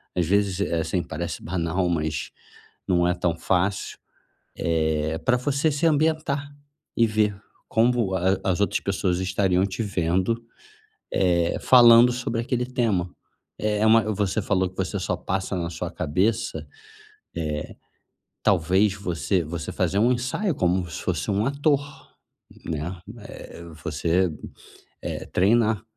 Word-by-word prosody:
às 90 - +1
vezes, 100 0 +1
é 85 -4 0
assim, 85 +2 -1
parece 85 +2 -5
banal, 90 +1 -1
mas 80 -2 -2 0.6
não 85 -1 +3
é 90 - +2
tão 90 -1 0
fácil, 95 +3 -1 0.6
eh, 80 -1 0
pra 125 -1 +2
você 140 +4 +1
se 145 +4 0
ambientar 155 -2 +1 0.5
e 115 - +4
ver 105 -1 +1 0.3
como 115 -4 +2
a 95 +1 +1
as 95 0 0
outras 100 - +1
pessoas 95 -2 -1
estariam 95 -1 +1
te 95 +3 -4
vendo, 95 +3 0 0.7
eh, 85 -2 +2
falando 120 -1 +7
sobre 120 -2 -2
aquele 125 0 -1
tema. 115 -8 0 0.5
É 105 0 +1
uma 110 +1 +6
você 100 +1 0
falou 95 -2 +1
que 95 - -24
você - - -2
só - - -2
passa 95 0 -3
na 85 -1 -3
sua - - -5
cabeça, 100 +9 0
eh, - - -13 1.8
talvez 95 +2 +3
você 90 -2 -1
você 80 +1 -5
fazer 100 - 0
um 120 +4 +4
ensaio 125 - -1
como 90 -4 0
se - - -6
fosse - - -2
um 100 +2 +1
ator, 140 0 +2 0.8
né? 85 +3 -4 0.2
Eh, 95 -4 -10 0.2
você, 85 +3 +1 0.7
eh, - - -5
treinar 110 +2 +2
95 Hz, 135 wpm, -24 LUFS, 85-115 Hz, 1.8 s, falando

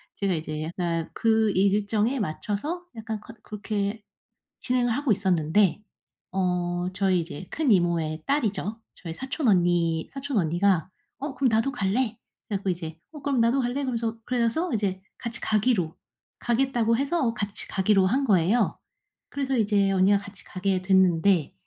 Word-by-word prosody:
제가 195 -2 0
이제 155 -1 -3
약간 165 0 -2
그 220 -1 +2
일정에 205 +6 +1
맞춰서 210 - -3
약간 220 -1 -5
커 230 - -12
그렇게 210 0 -3 0.6
진행을 245 -1 +1
하고 280 -2 0
있었는데 190 0 +2 0.5
어 180 -1 0
저희 185 -1 +2
이제 170 +1 -8
큰 295 -6 +1
이모의 165 -4 +1
딸이죠. 225 -5 -1 0.2
저희 165 -3 -7
사촌 265 - -3
언니 175 -3 +2
사촌 275 -2 -3
언니가 175 +1 +2 0.3
"어 280 0 -5
그럼 260 -1 +2
나도 225 +4 +2
갈래." 220 +2 0 0.3
그래 205 -3 -1
갖고 195 0 -3
이제 165 -3 -4
"어 300 -2 -10
그럼 275 -2 0
나도 235 +4 +3
갈래." 245 0 -1
그러면서 230 -3 -2
그래서 250 +8 0
이제 195 -4 -1 0.2
같이 235 -1 -5
가기로 210 -6 +1 0.4
가겠다고 240 -2 +1
해서 275 -3 0
같이 205 -2 -4
가기로 195 0 +3
한 265 +8 +1
거예요. 200 +1 +2 0.5
그래서 270 -2 -1
이제 205 -3 +2
언니가 195 +1 +4
같이 200 -3 -12
가게 185 0 -1
됐는데 185 -3 +3
205 Hz, 320 characters per minute, -26 LUFS, 180-240 Hz, 0.6 s, 언니가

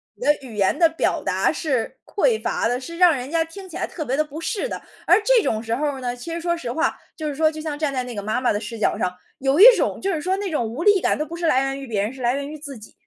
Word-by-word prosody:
你 - - -7
的 295 - +5
语 250 -5 -10
言 200 +5 +2
的 335 -2 +6
表 325 - 0
达 - - +1
是 260 -9 -2
匮 445 +2 +1
乏 - - 0
的， 245 +2 0
是 335 +6 -8
让 355 -3 +6
人 255 +1 -5
家 330 +1 +1
听 375 +4 -11
起 - - -10
来 - - -1
特 315 - -6
别 265 0 -1
的 305 - +3
不 300 +2 -8
适 440 +6 -2
的。 - - -6 0.2
而 435 - +5
这 485 -1 +4
种 220 - 0
时 230 0 -2
候 285 0 -2
呢， 245 -1 -3
其 245 +7 -7
实 335 - -4
说 345 0 0
实 245 -7 -5
话， 320 +5 0 0.2
就 310 - -4
是 290 - -3
说 315 +1 +3
就 310 0 -7
像 305 -2 -4
站 290 -2 -1
在 255 -1 -1
那 245 -2 -7
个 205 - -4
妈 215 +4 -1
妈 250 - +2
的 205 - 0
视 230 +1 -7
角 - - +1
上， 180 - -1 0.2
有 270 +4 +1
一 425 - +10
种 - - -1
就 390 - 0
是 325 - -1
说 370 +5 0
那 400 -2 -3
种 270 -7 -1
无 235 +8 -5
力 410 -1 +5
感 - - +1
都 305 - -2
不 335 - -7
是 345 - -2
来 265 -5 +3
源 270 0 -2
于 275 - -7
别 215 -5 -1
人， 210 +3 -1
是 265 -1 -11
来 240 +1 +2
源 280 +1 -4
于 310 - -7
自 285 -2 -8
己。 215 - -14
290 Hz, 345 characters per minute, -22 LUFS, 245-335 Hz, 0.2 s, 一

